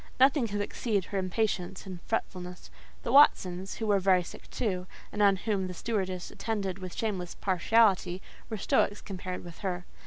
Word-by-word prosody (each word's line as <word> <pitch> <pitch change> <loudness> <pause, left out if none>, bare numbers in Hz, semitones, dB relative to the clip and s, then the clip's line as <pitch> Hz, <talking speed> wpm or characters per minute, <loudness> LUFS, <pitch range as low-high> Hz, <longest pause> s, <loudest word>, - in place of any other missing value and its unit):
Nothing 265 -1 +5
could 205 -1 -2
exceed 205 -2 -1
her 200 - -2
impatience 190 -1 -1
and 185 -3 -7
fretfulness. 180 -5 -4 0.3
The - - -2
Watsons, 190 -9 +5
who 225 - -3
were 205 -2 +3
very 185 -1 +4
sick - - -11
too, 185 -7 -2 0.2
and 210 - -2
on 200 -1 +6
whom 195 -1 -1
the 180 - -6
stewardess 190 -4 -2
attended 200 -4 -3
with 185 -2 -7
shameless 190 -6 -3
partiality, 190 -1 +3 0.3
were 220 - -3
stoics 205 +1 +2
compared 185 -1 -6
with 175 -2 -11
her. 180 -3 -3
195 Hz, 165 wpm, -29 LUFS, 180-215 Hz, 0.3 s, on